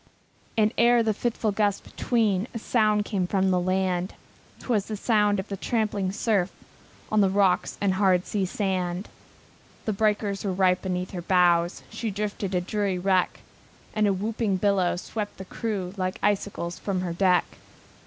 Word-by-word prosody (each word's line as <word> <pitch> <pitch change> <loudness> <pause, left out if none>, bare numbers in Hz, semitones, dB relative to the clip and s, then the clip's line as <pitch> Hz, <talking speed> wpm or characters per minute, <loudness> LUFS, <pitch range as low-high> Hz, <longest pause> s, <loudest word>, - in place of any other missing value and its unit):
And 215 0 +3
ever 235 0 +5
the 220 -1 +1
fitful 225 0 -1
gusts 205 -1 +1
between 215 -4 0
A - - 0
sound 215 -2 +2
came 190 -4 -1
from 190 0 +1
the 180 - +3
land; 185 0 0 0.4
It - - -13
was 215 -5 +1
the 215 - -4
sound 210 -2 +2
of 190 - -4
the 200 - -4
trampling 205 -2 -1
surf, 200 -3 0 0.6
On 215 -1 +4
the 195 - +4
rocks 195 -1 +2
and 200 -1 +2
the - - -1
hard 190 -2 +3
sea 195 -3 -1
sand. 185 -1 -2 0.8
The 215 - 0
breakers 205 -1 0
were 195 -2 -1
right 185 -1 +2
beneath 180 -1 -3
her 180 - -5
bows, 175 -1 +3
She 220 +1 -3
drifted 205 -1 -3
a 180 0 0
weary 200 -3 +1
wreck, 185 0 +1 0.5
And 215 -1 +2
a 200 - +3
whooping 210 0 -1
billow 190 -2 +2
swept 205 +3 -5
the 190 - -8
crew 195 -3 -3
Like 185 -1 -2
icicles 195 -4 -1
from 190 -3 -2
her 175 -2 -3
deck. 180 0 +3
195 Hz, 175 wpm, -26 LUFS, 185-210 Hz, 0.8 s, ever